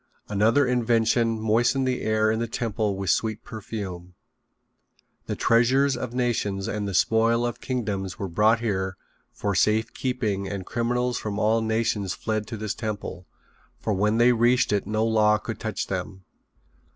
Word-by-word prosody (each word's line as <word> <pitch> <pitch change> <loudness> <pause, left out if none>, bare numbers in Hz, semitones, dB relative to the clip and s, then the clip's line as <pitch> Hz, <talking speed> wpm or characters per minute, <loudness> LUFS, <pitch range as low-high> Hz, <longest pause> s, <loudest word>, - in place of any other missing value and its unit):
Another 110 +7 +3
invention 115 -2 +2
moistened 120 +5 +2
the 125 -1 -1
air 110 0 +2
in 110 - -1
the 115 - -1
temple 110 -3 -2
with 95 -3 0
sweet 110 -1 -1
perfume. 95 -5 -7 1.1
The - - -2
treasures 130 +4 +3
of 125 - -4
nations 110 -6 -1
and 105 -1 -2
the 100 - -3
spoil 115 +4 +3
of 120 - -4
kingdoms 105 -7 -3
were 100 - -3
brought 110 +6 +3
here 95 -4 -2 0.3
for 100 - -2
safe 110 +4 +2
keeping 110 -7 -2
and 95 -1 -5
criminals 120 +1 -1
from 105 -1 -4
all 110 +2 +2
nations 110 -3 -1
fled 110 -1 -2
to 110 - -5
this 105 -1 -3
temple, 100 -5 -5 0.5
for 110 - -1
when 105 +3 +1
they 120 +1 +5
reached 120 0 +3
it 100 - 0
no 110 +1 0
law 105 -1 +4
could 105 - -6
touch - - -3
them. 95 0 -5
110 Hz, 160 wpm, -25 LUFS, 100-115 Hz, 1.1 s, they